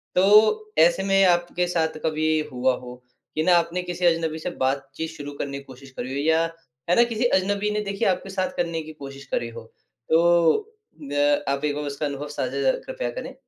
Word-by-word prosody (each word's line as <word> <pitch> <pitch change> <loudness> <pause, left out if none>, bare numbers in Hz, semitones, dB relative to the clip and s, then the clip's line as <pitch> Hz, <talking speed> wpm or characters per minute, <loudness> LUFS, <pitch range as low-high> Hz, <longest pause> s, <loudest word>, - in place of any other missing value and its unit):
तो 215 +3 +5 0.2
ऐसे 175 +3 -2
में 195 0 +3
आपके 175 0 +2
साथ 160 -3 -1
कभी 155 0 +1
हुआ 125 +1 +1
हो 125 0 -9 0.4
कि 155 - +1
ना 180 0 +5
आपने 170 +2 0
किसी 180 0 -3
अजनबी 165 -2 +1
से 170 - -3 0.2
बातचीत 135 +4 -2
शुरू 145 -3 -8
करने 140 -1 -3
की 140 - -9
कोशिश 135 0 -14
करी 125 +1 -4
हो 140 - -2
या 160 +1 +4 0.5
है 175 - +4
ना 235 - +6
किसी 235 0 -1
अजनबी 200 +2 0
ने 210 0 -1
देखिए 200 -1 -1
आपके 185 +1 -1
साथ 190 -1 -2
करने 170 -2 -1
की 155 0 -10
कोशिश 140 -1 -10
करी 120 - -1
हो। 115 - -7 0.5
तो 170 - +3 0.2
द 145 0 +1
आप 140 +1 -1
1 145 - 0
बार 150 - -3
उसका 140 +1 -3
अनुभव 145 0 -4
साझा 150 - -3
ज़रा - - +4
कृपया - - -4
करें। 270 - -8
165 Hz, 205 wpm, -24 LUFS, 145-190 Hz, 0.5 s, ना